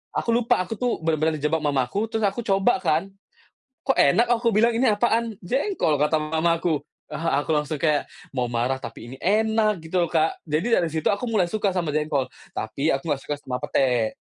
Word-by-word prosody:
Aku - - -2
lupa, 235 0 +3
aku 185 - -5
tuh 245 -1 +1
bener-bener 160 0 +1
dijebak 150 +2 0
mamaku, 145 - 0
terus 225 -1 -3
aku 200 +3 0
coba 195 0 +2
kan. 165 +3 0 0.8
"Kok 270 - +3
enak," 230 +12 +5
aku 235 0 +2
bilang, 230 +3 +4
"Ini 230 -2 +3
apaan?". 230 -1 +1
"Jengkol", 250 - 0
kata 150 +2 +2
mama 160 +2 +1
aku. 165 -3 0 0.3
Ah, 165 -3 -1
aku 160 - -1
langsung 150 0 -1
kayak, 150 -2 +1 0.2
mau 125 -2 -1
marah 125 +3 -1
tapi 115 0 -8
ini 130 - -9
enak 215 +1 +2
gitu 165 +3 -1
loh, 170 - -1
Kak. 160 -1 0
Jadi 165 +10 0
dari 170 - +2
situ 160 0 -4
aku 200 - +1
mulai 205 -6 +2
suka 200 +2 0
sama 170 -5 -2
jengkol. 150 -3 0 0.2
Tapi 140 +8 -2
aku 135 - 0
nggak 145 -3 -1
suka 145 - -3
sama 125 -3 -5
pete. 125 -5 +1
165 Hz, 195 wpm, -24 LUFS, 145-215 Hz, 0.8 s, enak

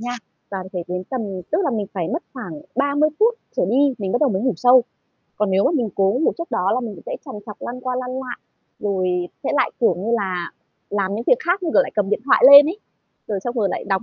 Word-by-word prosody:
nha. 245 +1 -4 0.4
Và 195 - -3
phải 180 -2 -4
đến 180 +1 -3
tầm 260 - -2 0.3
tức 315 - +1
là 295 - +1
mình 215 -4 -2
phải 175 -4 -2
mất 325 +5 -2
khoảng 180 - -8 0.2
30 285 +3 +2
phút 455 +3 +4 0.2
trở - - +1
đi, 275 +2 +3
mình 195 -3 -3
bắt 245 - +1
đầu 290 -4 +3
mới 190 -1 -1
ngủ 255 -1 +2
sâu. 250 +5 +6 0.5
Còn 210 -2 0
nếu 190 +1 +3
mà - - +3
mình 240 -7 0
cố 195 +4 +2
ngủ - - +3
trước 335 - -6
đó 195 -5 +1
là 255 - 0
mình 230 -4 -5
cũng - - -13
sẽ - - -4
trằn 270 - -8
trọc, 210 - -8
lăn 250 +1 -6
qua 255 0 -3
lăn 250 0 -4
lại, 255 -1 -5 0.4
rồi 195 -3 -1 0.4
sẽ - - 0
lại, 270 -3 +2
kiểu 235 - +4
như 200 +6 -4
là, 185 -6 -1 0.4
làm 200 -1 -1
những 225 +3 -4
việc - - +4
khác, 365 +2 +1
như 335 - -1
kiểu, - - +6
lại - - -6
cầm 205 -2 0
điện - - +1
thoại 275 - +3
lên 285 +1 +11
ấy. 345 +6 -3 0.5
Rồi 205 -2 -2
xong 240 - -3
rồi 210 -4 +1
lại - - -4
đọc 195 -2 +1
240 Hz, 265 wpm, -21 LUFS, 195-275 Hz, 0.5 s, lên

